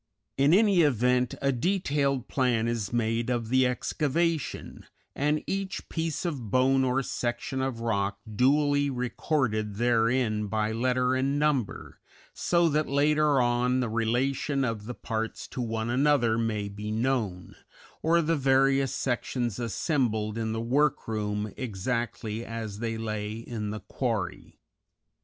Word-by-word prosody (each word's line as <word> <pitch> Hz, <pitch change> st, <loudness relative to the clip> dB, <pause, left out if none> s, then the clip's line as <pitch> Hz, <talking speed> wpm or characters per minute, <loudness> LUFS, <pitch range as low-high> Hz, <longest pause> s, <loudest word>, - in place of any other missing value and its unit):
In 140 Hz, +2 st, +4 dB
any 200 Hz, -1 st, +5 dB
event, 125 Hz, -3 st, +2 dB
a 140 Hz, -, +3 dB
detailed 140 Hz, -3 st, 0 dB
plan 120 Hz, -4 st, +1 dB
is 115 Hz, -4 st, -2 dB
made 115 Hz, 0 st, 0 dB
of 120 Hz, -3 st, -1 dB
the 130 Hz, 0 st, +4 dB
excavation, 155 Hz, +5 st, -2 dB, 0.3 s
and 150 Hz, +2 st, 0 dB
each 195 Hz, -1 st, -4 dB
piece 165 Hz, 0 st, -2 dB
of 135 Hz, -10 st, -3 dB
bone 130 Hz, +4 st, +3 dB
or 130 Hz, +1 st, +1 dB
section 120 Hz, +2 st, -3 dB
of 130 Hz, -3 st, -2 dB
rock 100 Hz, -4 st, 0 dB
duly 145 Hz, +5 st, +2 dB
recorded 125 Hz, -4 st, -1 dB
therein 115 Hz, -1 st, +1 dB
by 110 Hz, +1 st, 0 dB
letter 125 Hz, +2 st, +1 dB
and 135 Hz, +2 st, +1 dB
number, 145 Hz, -7 st, -1 dB, 0.3 s
so 170 Hz, -1 st, +2 dB
that 150 Hz, 0 st, 0 dB
later 150 Hz, 0 st, +3 dB
on 125 Hz, +1 st, +2 dB
the 125 Hz, -3 st, -1 dB
relation 130 Hz, +5 st, 0 dB
of 110 Hz, -3 st, -3 dB
the 125 Hz, +2 st, -6 dB
parts 115 Hz, -1 st, -4 dB
to 125 Hz, -, -4 dB
one 115 Hz, 0 st, -2 dB
another 130 Hz, -3 st, +3 dB
may 110 Hz, -3 st, -1 dB
be 105 Hz, +1 st, -6 dB
known, 110 Hz, -6 st, -1 dB, 0.5 s
or 170 Hz, +1 st, +3 dB
the 165 Hz, +2 st, +1 dB
various 135 Hz, -1 st, +3 dB
sections 120 Hz, -3 st, -2 dB
assembled 115 Hz, -, -1 dB
in 110 Hz, -1 st, -2 dB
the 115 Hz, -, -2 dB
work 140 Hz, +6 st, +1 dB
room 105 Hz, -2 st, -2 dB
exactly 115 Hz, 0 st, -3 dB
as 110 Hz, -3 st, -6 dB
they 115 Hz, -1 st, -2 dB
lay 110 Hz, -1 st, -3 dB
in 115 Hz, -2 st, -5 dB
the 105 Hz, +1 st, -5 dB
quarry. 110 Hz, -9 st, -3 dB
125 Hz, 140 wpm, -28 LUFS, 110-140 Hz, 0.5 s, any